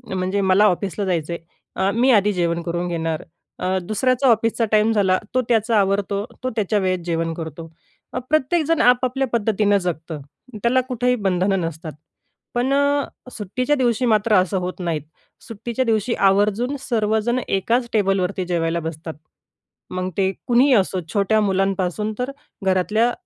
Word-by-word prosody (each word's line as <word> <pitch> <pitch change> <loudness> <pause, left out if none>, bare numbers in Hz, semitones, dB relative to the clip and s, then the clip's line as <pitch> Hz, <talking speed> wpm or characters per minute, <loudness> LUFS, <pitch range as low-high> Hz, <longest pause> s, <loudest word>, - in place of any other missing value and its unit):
म्हणजे 185 +2 -1
मला 190 +2 +4
ऑफिसला 200 +1 0
जायचं 170 -2 -1
आहे - - -5 0.4
अ, 190 +1 +1
मी 250 +3 +3
आधी 210 -3 +4
जेवण 170 -1 0
करून 170 +1 -3
घेणार. 165 -2 -2 0.4
अ, 185 +1 0
दुसऱ्याचा 255 +7 +1
ऑफिसचा 230 0 +2
टाईम 215 +1 +4
झाला 195 -4 +3 0.2
तो 255 - +4
त्याचा 225 -1 +2
आवरतो. 200 +1 0 0.2
तो 255 - 0
त्याच्या 210 -1 +1
वेळेत 185 -2 0
जेवण 165 -1 -1
करतो. 160 0 -7 0.6
प्रत्येकजण 310 +2 +2
आपापल्या 255 +2 +3
पद्धतीनं 210 -2 +2
जगतं. 165 -4 -4 0.4
त्याला 255 +2 +3
कुठेही 250 0 +1
बंधनं 195 -2 +1
नसतात. 165 -1 -5 0.6
पण 250 +3 +1
अ, 285 0 +2 0.3
सुट्टीच्या 250 +8 -1
दिवशी 250 -2 +1
मात्र 215 -1 +3
असं 185 +1 +2
होत 180 +1 -5
नाहीत. 170 -4 -2 0.5
सुट्टीच्या 235 +2 -3
दिवशी 225 0 +1 0.2
आवर्जून 210 +7 +1
सर्वजण 220 +1 +1
एकाच 235 +5 0
टेबलवरती 195 -2 +1
जेवायला 170 -1 0
बसतात. 160 0 -6 0.8
मग 185 0 -2
ते 190 -1 +2 0.2
कुणीही 255 +3 +4
असो 190 -4 +2
छोट्या 210 +1 +2
मुलांपासून 195 +1 0
तर 250 +2 -2 0.3
घरातल्या 210 +6 +2
205 Hz, 145 wpm, -21 LUFS, 185-235 Hz, 0.8 s, मला